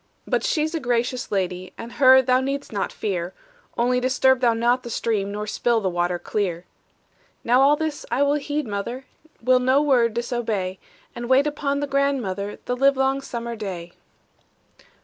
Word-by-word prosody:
"But - - 0
she's 315 -10 0
a 325 - -1
gracious 245 -1 -1
lady, 185 -2 -2
And 230 +1 -8
her 260 -1 +6
thou 255 0 +3
need'st 275 -1 -4
not 200 - -2
fear; 180 -3 -3 0.4
Only 250 +1 +2
disturb 260 +1 +3
thou 240 -2 +3
not 240 +2 +2
the 240 - -8
stream, 210 -3 -1
Nor 210 +1 -4
spill 235 +2 +1
the 190 -4 -1
water 175 0 0
clear." 180 -2 -3 0.8
"Now 245 +3 +4
all 285 +2 +5
this 310 -1 -3
I 275 - +2
will 285 0 +2
heed, 295 0 -2
mother, 235 +5 -5 0.4
Will 255 +1 +4
no 260 +2 +3
word 250 -6 +2
disobey, 225 -6 -2 0.4
And 240 0 -6
wait 265 +2 +5
upon 285 -1 -1
the - - 0
grandmother 260 -8 -1
This 245 0 -2
livelong 270 0 +3
summer 235 -3 -5
day." 180 -5 -6
245 Hz, 170 wpm, -23 LUFS, 210-270 Hz, 0.8 s, her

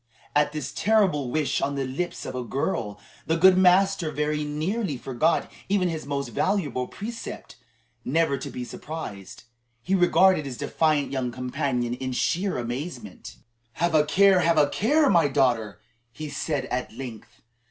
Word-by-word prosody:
At 150 0 +3
this 150 -3 -4
terrible 190 - +2
wish 145 0 0
on 140 0 -1
the 135 -1 -1
lips 145 +8 -4
of - - -5
a 125 -1 -3
girl, 115 - -2 0.3
the 160 - +2
good 185 +2 +7
master 185 -2 +4
very 150 0 -1
nearly 155 - -2
forgot 135 +7 0 0.2
even 190 -3 +2
his 160 -4 -5
most 140 -1 -2
valuable 145 - -1
precept 225 - -8 0.5
never 150 +2 +1
to - - -6
be 125 - -6
surprised. 120 -8 -8 0.4
He 190 - -1
regarded 185 -2 +4
his 125 -3 -6
defiant 155 -3 +1
young 130 -3 -2
companion 125 -1 -2
in 130 +1 -4
sheer 185 +9 0
amazement. 120 - -6 0.4
"Have 170 +5 0
a 155 -1 +5
care, 195 +4 +4
have 170 -1 +2
a 145 -2 +5
care, 290 - +2
my 170 - +4
daughter!" 115 -8 +1 0.3
he 155 +5 -7
said 140 -1 -2
at 125 0 -2
length. 120 -2 -9
150 Hz, 155 wpm, -25 LUFS, 125-180 Hz, 0.5 s, good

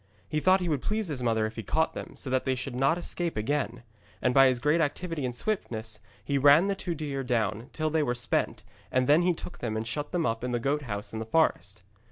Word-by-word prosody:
He 155 - -1
thought 185 +4 +4
he 180 - -1
would 150 -5 0
please 215 -3 -1
his 140 -4 -3
mother 110 -2 +1
if 110 +1 -6
he - - -2
caught 160 +9 0
them, - - -7
so 130 - -4
that 130 0 +2
they 130 -1 0
should 125 +1 -5
not 135 +6 +2
escape 175 -4 -2
again. 120 0 -1 0.4
And 125 - +1
by 135 0 +7
his 130 -1 +2
great 150 +6 +2
activity 160 -1 -2
and 125 -1 -3
swiftness 115 - -2 0.3
he 140 +3 +1
ran 145 +6 +7
the 200 - +1
two 180 -3 -4
deer 145 -3 -3
down 115 -1 -1
till 155 -1 -1
they 160 0 +2
were 125 -4 0
spent, 120 0 0 0.3
and 130 0 +2
then 150 +5 +5
he 175 -1 +2
took 175 - -9
them 110 -2 -2
and 110 - -3
shut 145 +6 -4
them 175 -3 0
up 115 -2 -1
in 125 0 -2
the 120 - +1
goat 140 +5 0
house 105 -6 -5
in 110 - -3
the 110 - -4
forest. 105 - +1
135 Hz, 255 wpm, -28 LUFS, 115-160 Hz, 0.4 s, by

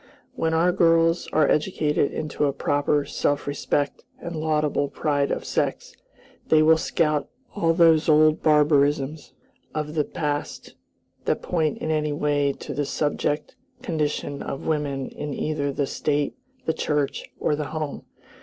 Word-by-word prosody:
When 160 0 0
our 170 +2 +3
girls 165 -1 +3
are 155 -2 +3
educated 150 -3 +1
into 150 -1 -2
a 140 - +1
proper 145 +1 +1
self 145 0 -1
respect 145 0 -1
and 170 0 -7
laudable 150 -2 0
pride 145 -2 0
of - - -2
sex, - - -2 0.5
they 155 -1 +5
will 160 +1 +5
scout 150 -3 0 0.2
all 165 -5 +1
these 165 -1 +5
old 155 0 +5
barbarisms 150 -1 +2 0.4
of 150 0 -3
the 155 -2 +1
past 145 -1 -4 0.5
that - - 0
point 160 -4 0
in 160 - -3
any 150 -1 0
way 145 -1 +1
to - - -7
the 145 - -1
subject 150 0 -1 0.3
condition 150 -3 -2
of 135 - -5
women 145 -4 -1
in 145 -1 -5
either 145 -2 -1
the 140 +1 -1
State, 145 +1 -1 0.3
the 160 - +1
Church, 150 -3 -1
or 150 - +1
the 150 0 -3
home. 155 -1 -4
150 Hz, 145 wpm, -24 LUFS, 145-155 Hz, 0.5 s, they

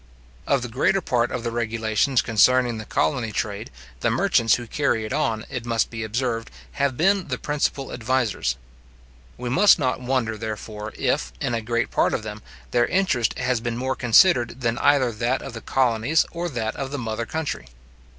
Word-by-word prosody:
Of 135 -3 +2
the - - -3
greater 130 +11 +1
part 120 -8 0
of 125 -2 -4
the 115 - -2
regulations 115 +2 +1
concerning 120 +1 +3
the 110 - -7
colony 110 +8 0
trade, 105 0 -3 0.3
the - - +1
merchants 115 -1 +3
who 120 - -6
carry 115 -2 0
it 110 - -4
on, 110 -1 -1
it 125 -4 -5
must 115 -1 0
be 115 -1 -4
observed, 115 +1 -2 0.3
have 140 -3 +1
been 195 +2 +2
the 125 -3 -2
principal 145 -2 -2
advisers. 120 - 0 0.8
We 125 - -5
must 195 +12 +6
not 130 -5 -1
wonder, 120 -4 -1
therefore, 110 0 -6
if, 65 -1 0
in 120 - -1
a 115 - -1
great 115 +2 -1
part - - +2
of 110 - -4
them, 105 0 -7 0.3
their 120 -1 +3
interest 170 - +1
has 125 -2 0
been 120 0 -3
more 130 +1 -1
considered 125 -1 +4
than 115 0 0
either 135 -4 +3
that 120 +4 -1
of 135 - -7
the 115 - -7
colonies 130 +4 +2
or 175 +1 -3
that 115 -6 -3
of 135 - -3
the 145 - -4
mother 115 -2 -3
country. 155 - -4
120 Hz, 185 wpm, -23 LUFS, 110-130 Hz, 0.8 s, must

